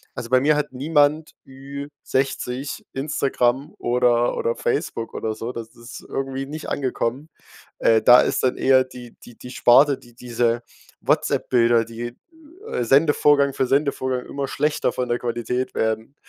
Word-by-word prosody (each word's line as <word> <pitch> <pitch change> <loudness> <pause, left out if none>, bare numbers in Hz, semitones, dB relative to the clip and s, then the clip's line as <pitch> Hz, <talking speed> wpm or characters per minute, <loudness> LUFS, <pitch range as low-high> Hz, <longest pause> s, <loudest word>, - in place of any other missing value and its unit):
also, 115 - -6
bei 130 +1 +4
mir 150 +2 +3
hat 145 -2 -3
niemand 150 +3 +1 0.2
Ü-60 135 -1 -4
Instagram 135 -1 -1
oder 120 0 +2
oder 475 +1 -1
Facebook 420 - -3
oder 110 -1 -3
so, 115 +3 -5
das 115 -1 -7
ist 120 0 -11
irgendwie 135 0 -4
nicht 155 +3 -7
angekommen. 130 +2 -2 0.5
Äh, 110 -1 +4
da 120 +3 +8
ist - - -1
dann 130 - +1
eher 130 -1 +4
die 125 -2 -12
die 120 - -15
die 125 - -10
Sparte, 135 +3 +5
die 120 - -19
diese 120 -1 -1 0.4
Whatsapp-Bilder, 115 -2 +2
die 120 +1 -7 0.5
äh, - - -1
Sendevorgang 140 +1 +3
für 130 - 0
Sendevorgang 130 -2 0
immer 140 -1 -4
schlechter 150 0 0
von 125 - -2
der 120 - +1
Qualität 125 +2 -3
werden, 110 +4 -2
130 Hz, 145 wpm, -22 LUFS, 120-140 Hz, 0.5 s, da